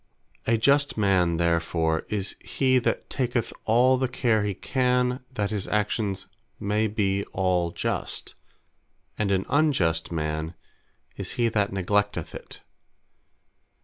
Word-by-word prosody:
A 115 Hz, -, +4 dB
Just 140 Hz, +4 st, +3 dB
man 95 Hz, -5 st, +3 dB
therefore, 85 Hz, -1 st, +1 dB
is 100 Hz, -1 st, -2 dB
he 130 Hz, -1 st, +2 dB
that 120 Hz, -, -1 dB
taketh 120 Hz, -3 st, -1 dB
all 125 Hz, +4 st, +4 dB
the 130 Hz, -, +1 dB
care 120 Hz, -3 st, +1 dB
he 100 Hz, -2 st, -1 dB
can, 125 Hz, +1 st, +1 dB
that 105 Hz, -5 st, -2 dB
his 105 Hz, -3 st, -2 dB
Actions 105 Hz, -2 st, -1 dB, 0.3 s
may 105 Hz, +1 st, +1 dB
be 100 Hz, -2 st, 0 dB
all 90 Hz, -2 st, +1 dB
Just: -, -, -3 dB, 0.9 s
and 105 Hz, -2 st, +1 dB
an 95 Hz, -1 st, +1 dB
Unjust 95 Hz, -, +2 dB
man, 80 Hz, +1 st, -2 dB, 0.6 s
is -, -, -4 dB
he 120 Hz, -1 st, +2 dB
that 105 Hz, -2 st, 0 dB
neglecteth 100 Hz, -2 st, 0 dB
it. -, -, -10 dB
105 Hz, 125 wpm, -26 LUFS, 90-120 Hz, 0.9 s, A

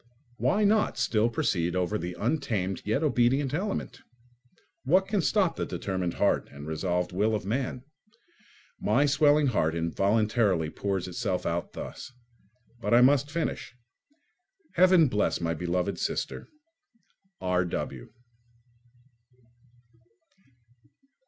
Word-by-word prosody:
Why 210 Hz, +2 st, +1 dB
not 210 Hz, +1 st, +2 dB
still 110 Hz, +1 st, +2 dB
proceed 90 Hz, -6 st, -1 dB
over 90 Hz, +3 st, 0 dB
the 90 Hz, +1 st, -5 dB
untamed 110 Hz, -, -1 dB
yet 110 Hz, +8 st, 0 dB
obedient 135 Hz, -1 st, +2 dB
element? 195 Hz, +6 st, -3 dB, 0.8 s
What 185 Hz, +8 st, +3 dB
can 200 Hz, -1 st, 0 dB
stop 190 Hz, -1 st, +1 dB
the -, -, -1 dB
determined 95 Hz, -3 st, -3 dB
heart -, -, +1 dB
and 70 Hz, +1 st, -10 dB
resolved 90 Hz, +3 st, -2 dB
will 105 Hz, +4 st, +1 dB
of 105 Hz, -, -4 dB
man? 125 Hz, +3 st, -2 dB, 1.0 s
My 120 Hz, +7 st, +2 dB
swelling 145 Hz, +1 st, +4 dB
heart 85 Hz, -, +1 dB
involuntarily 100 Hz, 0 st, +1 dB
pours 95 Hz, -3 st, -2 dB
itself 90 Hz, 0 st, -2 dB
out 85 Hz, +1 st, -2 dB
thus. -, -, -8 dB, 0.7 s
But 120 Hz, -, +1 dB
I 120 Hz, -, +7 dB
must 140 Hz, +2 st, +4 dB
finish. 160 Hz, -5 st, -3 dB, 1.0 s
Heaven 180 Hz, -2 st, +5 dB
bless 105 Hz, -4 st, 0 dB
my 85 Hz, -1 st, -1 dB
beloved 90 Hz, +2 st, -2 dB
sister! -, -, -3 dB, 0.9 s
R.W. 90 Hz, -1 st, -2 dB
110 Hz, 110 wpm, -27 LUFS, 90-145 Hz, 1.0 s, I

